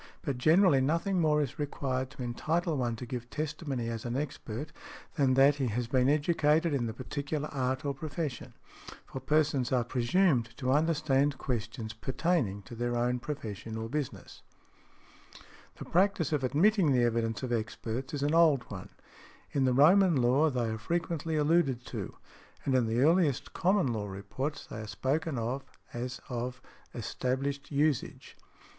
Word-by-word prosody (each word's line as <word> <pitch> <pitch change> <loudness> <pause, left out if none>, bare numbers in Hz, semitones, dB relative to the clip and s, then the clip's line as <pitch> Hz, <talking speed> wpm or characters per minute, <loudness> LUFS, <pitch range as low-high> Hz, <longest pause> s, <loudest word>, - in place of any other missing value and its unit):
But 140 -6 -2
generally 160 0 +5
nothing 170 +7 +1
more 150 -2 +3
is 135 - -6
required 130 -3 -2
to 135 -2 -8
entitle 160 +7 -1
one 120 -4 -1
to 125 - -7
give 120 0 -6
testimony 150 -5 -3
as 115 -1 -4
an 120 0 -3
expert, 145 -1 -5 0.4
than 135 -4 +2
that 135 +2 +5
he 135 -3 0
has 120 +2 -1
been 130 +2 +2
educated 155 +1 +2
in 125 -4 0
the - - -3
particular 140 +5 -4
art 130 0 -2
or 140 - 0
profession; 145 -2 -5 0.5
for 130 - -7
persons 145 -4 +1
are 125 -2 +3
presumed 125 0 +1
to 130 -1 0
understand 145 -2 +2
questions 115 -3 -4
pertaining 130 - -1
to 120 - -11
their 120 +1 -2
own 125 +1 +1
profession 115 -5 -6
or 110 0 -4
business. 145 0 -5 1.3
The - - -8
practice 185 -4 +2
of 145 -3 0
admitting 165 - +3
the 125 -1 +3
evidence 115 0 0
of 125 -2 -1
experts 115 +3 -3
is 140 - -3
an 145 +2 +1
old 160 -6 +5
one: 95 -3 -7 0.6
in 135 -2 +1
the 130 - +3
Roman 170 +6 +6
Law 130 +5 +3
they 125 -4 -1
are 110 - -4
frequently 165 +2 -2
alluded 150 -5 +2
to, - - -6 0.5
and 135 - +1
in 125 -3 +3
the 115 +2 +1
earliest 155 -2 +2
Common 190 +1 +2
Law 105 -2 -3
reports 100 +10 -5
they - - -8
are 110 - -7
spoken 135 +6 -1
of 120 +4 -2 0.3
as 125 +1 -4
of 125 +1 -4 0.4
established 135 +4 -2
usage. 145 -2 -1
135 Hz, 160 wpm, -30 LUFS, 120-150 Hz, 1.3 s, Roman